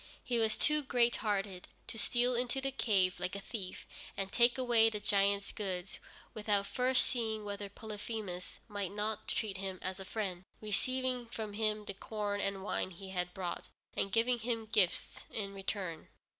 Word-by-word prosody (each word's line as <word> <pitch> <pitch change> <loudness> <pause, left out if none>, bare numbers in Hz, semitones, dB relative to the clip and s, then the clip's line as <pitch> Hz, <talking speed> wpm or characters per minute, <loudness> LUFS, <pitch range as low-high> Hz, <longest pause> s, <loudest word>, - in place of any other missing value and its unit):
He 240 -2 +1
was 220 -1 +3
too 300 0 +4
great 245 -3 +3
hearted 195 -4 -1 0.2
to 225 - -5
steal 245 +3 +3
into 245 +2 +2
the 270 0 0
cave 195 -8 +3
like 180 +2 -1
a - - -2
thief 195 -3 -5 0.3
and 195 0 -1
take 240 +1 +5
away 240 -3 +5
the 215 -1 -3
giant's 200 -1 +2
goods 185 -4 -3 0.3
without 210 -2 +1
first 255 +3 +3
seeing 220 -3 -1
whether 200 0 -4
Polyphemus 210 -3 -5
might 205 -4 -2
not 210 +1 -2
treat 205 -4 -1
him 190 -1 -3
as 185 +1 -3
a - - -5
friend, 190 -3 -3 0.2
receiving 255 +3 0
from 220 -2 -4
him 215 0 0
the 200 - -4
corn 205 0 -2
and 195 -1 -1
wine 200 - 0
he 190 +2 -9
had 180 -1 -1
brought, 180 -2 -3 0.3
and 195 - 0
giving 235 +3 +3
him 230 -1 -1
gifts 205 -5 +2
in 200 -2 -3
return. 190 -4 -3
210 Hz, 170 wpm, -34 LUFS, 195-230 Hz, 0.3 s, take